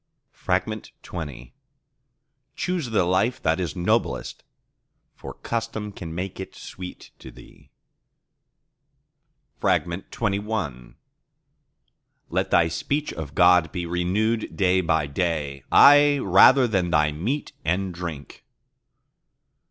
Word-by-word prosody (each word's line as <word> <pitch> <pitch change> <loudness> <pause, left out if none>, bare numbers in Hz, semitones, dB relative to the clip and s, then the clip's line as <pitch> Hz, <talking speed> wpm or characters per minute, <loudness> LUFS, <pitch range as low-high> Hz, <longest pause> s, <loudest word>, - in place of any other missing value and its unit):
XX - - -1 1.6
Choose 180 -7 -2
the 110 -4 +2
life 95 +7 +1
that 80 +2 +1
is 85 -5 -3
noblest, 90 - -1 0.7
for - - -10
custom 115 -2 -4
can 80 -4 -8
make 95 +2 -5
it 95 - -8
sweet 90 -1 -10
to - - -11
thee. - - -17 1.9
XXI 95 - -2 1.4
Let - - 0
thy 85 - +4
speech 140 - -2
of 75 -2 -7
God 90 -3 +5
be 90 -1 -4
renewed 95 +6 -1
day 95 -1 +3
by 80 -3 +1
day, 75 -2 -2
aye, 145 0 +7
rather 125 +4 +6
than 95 -5 0
thy 75 -2 +2
meat 110 - -3
and 90 +3 -1
drink. 85 -5 -8
90 Hz, 100 wpm, -24 LUFS, 80-110 Hz, 1.9 s, aye